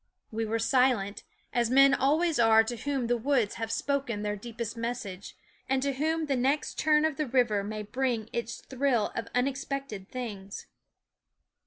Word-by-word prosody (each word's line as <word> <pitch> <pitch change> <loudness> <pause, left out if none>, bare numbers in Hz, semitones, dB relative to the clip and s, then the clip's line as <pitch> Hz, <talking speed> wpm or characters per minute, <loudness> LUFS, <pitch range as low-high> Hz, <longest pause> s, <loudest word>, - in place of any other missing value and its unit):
We 225 0 -2
were 220 +1 -1
silent, 230 -4 +2 0.3
as 240 -3 +2
men 275 +2 +6
always 305 +3 +2
are 225 -1 +6
to 240 +2 -4
whom 265 +1 -2
the 240 +1 +1
woods 245 -3 +1
have 225 0 -2
spoken 245 -5 -1
their 210 0 -1
deepest 230 +1 -6
message, 230 -5 -5
THE - - -37
WOODS - - -33
9 - - +2
and 260 - 0
to 280 -1 0
whom 320 0 +1
the 280 -2 0
next 270 +4 0
turn 305 0 +4
of 315 -3 -1
the 305 - -1
river 235 -5 +2
may 215 +1 -4
bring 235 0 -1
its 235 - -3
thrill 260 -5 0
of 230 0 -3
unexpected 265 -5 -2
things. 210 -6 -6
245 Hz, 180 wpm, -29 LUFS, 220-275 Hz, 0.3 s, men